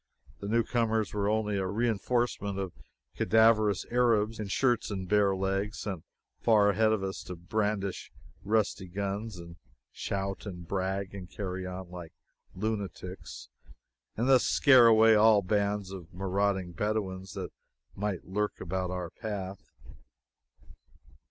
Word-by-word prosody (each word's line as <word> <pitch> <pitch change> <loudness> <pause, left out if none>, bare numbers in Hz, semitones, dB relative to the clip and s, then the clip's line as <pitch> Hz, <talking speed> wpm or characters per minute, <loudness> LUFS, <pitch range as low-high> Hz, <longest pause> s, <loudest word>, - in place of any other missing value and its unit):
The 100 - -6
new 115 +2 +2
comers 110 -3 0
were 100 -1 0
only 105 -1 0
a 95 -1 -1
reinforcement 110 -1 0
of 95 -3 -3 0.4
cadaverous 110 -3 +4
Arabs, 115 -3 +2
in 105 - -3
shirts 120 +3 +1
and 95 -3 -4
bare 100 -1 +3
legs, 95 +2 -1
sent 95 -6 -4 0.4
far 105 -3 +4
ahead 110 +2 +3
of 110 -3 0
us 95 0 -4
to 90 - -6
brandish 100 +2 -2 0.3
rusty 105 -2 0
guns, 100 +3 -4
and 85 -1 -10 0.3
shout 100 +1 -4
and 90 -3 -7
brag, 95 +1 -2
and 95 -3 -8
carry 95 -2 -4
on 90 -1 -7
like 90 -3 -9 0.4
lunatics, 100 -3 -5 0.7
and 120 +3 0
thus 130 -2 +6
scare 130 -4 +6
away 110 0 +7
all 105 -1 +6
bands 100 0 0
of 90 -2 -9
marauding 95 0 -1
Bedouins 95 0 -3
that - - -5 0.4
might 100 -2 -3
lurk 105 +2 -2
about 90 +1 -2
our 90 -2 -4
path. 100 -4 -6
100 Hz, 135 wpm, -29 LUFS, 95-110 Hz, 0.7 s, away